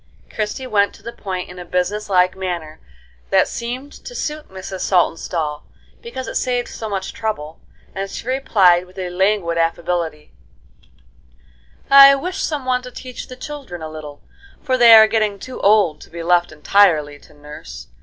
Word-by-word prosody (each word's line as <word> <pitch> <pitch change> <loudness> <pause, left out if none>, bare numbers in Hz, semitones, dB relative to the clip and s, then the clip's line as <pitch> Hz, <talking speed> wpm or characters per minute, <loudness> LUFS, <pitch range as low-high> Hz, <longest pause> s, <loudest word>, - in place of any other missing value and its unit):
Christie 215 +4 -3
went 205 -4 +1
to - - -18
the 235 - -7
point 185 -3 -5
in 180 0 -11
a - - -6
business 180 +4 -2
like 185 -1 +3
manner 175 -5 -5 0.5
that - - +4
seemed 255 +5 -6
to - - -9
suit 300 -6 -4
Mrs. 190 0 -7
Saltonstall, 165 -4 0 0.4
because 365 - -7
it - - -5
saved 245 -1 -1
so 220 - -6
much 195 -2 -4
trouble, 165 -9 -4 0.3
and 195 +1 -4
she 230 - -8
replied, 190 -9 +3
with 185 +1 -20
a 180 -2 -4
languid 185 -2 +1
affability: 165 -2 -2 1.6
"I 275 0 +10
wish 360 +7 -4
some 295 -4 -2
one 250 -1 +1
to 250 - -9
teach 255 0 -9
the 255 - -9
children 255 - -8
a 155 - -5
little, 150 -2 -10 0.4
for 260 -3 +1
they 235 -2 +8
are 220 0 +9
getting 215 -2 0
too 255 +6 -9
old 200 -7 +3
to - - -13
be 170 0 -7
left 175 0 +2
entirely 155 -3 +2
to 150 - -20
nurse. 145 - -10
190 Hz, 170 wpm, -19 LUFS, 170-245 Hz, 1.6 s, I